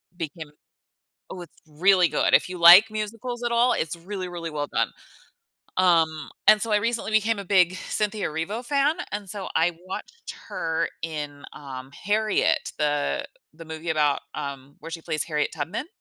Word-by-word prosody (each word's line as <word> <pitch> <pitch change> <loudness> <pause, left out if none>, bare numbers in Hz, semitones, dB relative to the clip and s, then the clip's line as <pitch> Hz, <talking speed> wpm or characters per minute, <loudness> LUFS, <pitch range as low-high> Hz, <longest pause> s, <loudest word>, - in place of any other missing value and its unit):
became 160 -2 -6 0.8
oh, 185 - -7
it's 175 - -14
really 180 +3 +4
good, - - +1
if - - +5
you 180 - -6
like 175 +6 +9
musicals 230 +3 -4
at 240 - -1
all, 240 +2 +4
it's 160 +1 -2
really, 185 +2 -6
really 170 -2 -6
well 145 -2 -3
done. - - 0 0.9
Um, 165 -4 +2 0.2
and 215 0 +7
so 230 - -2
I 210 - +5
recently 230 +1 -1
became 215 0 +2
a - - -7
big 185 -2 +3
Cynthia 210 -1 -1
Erivo 180 +10 -4
fan, 285 +3 +2 0.2
and 205 -2 -4
so 200 -1 -6
I 165 +1 +2
watched 465 - -7
her 165 0 -1
in, 150 -3 -5
um, 130 -2 -9
Harriet, 215 +2 +1
the 145 -1 0 0.3
the 165 +1 -11
movie 160 +1 -5
about, 150 -2 +2
um, 140 0 -7
where 165 - -9
she 165 0 -6
plays 155 -1 -2
Harriet 150 -2 -1
Tubman. 165 - -4
175 Hz, 170 wpm, -25 LUFS, 155-210 Hz, 0.9 s, like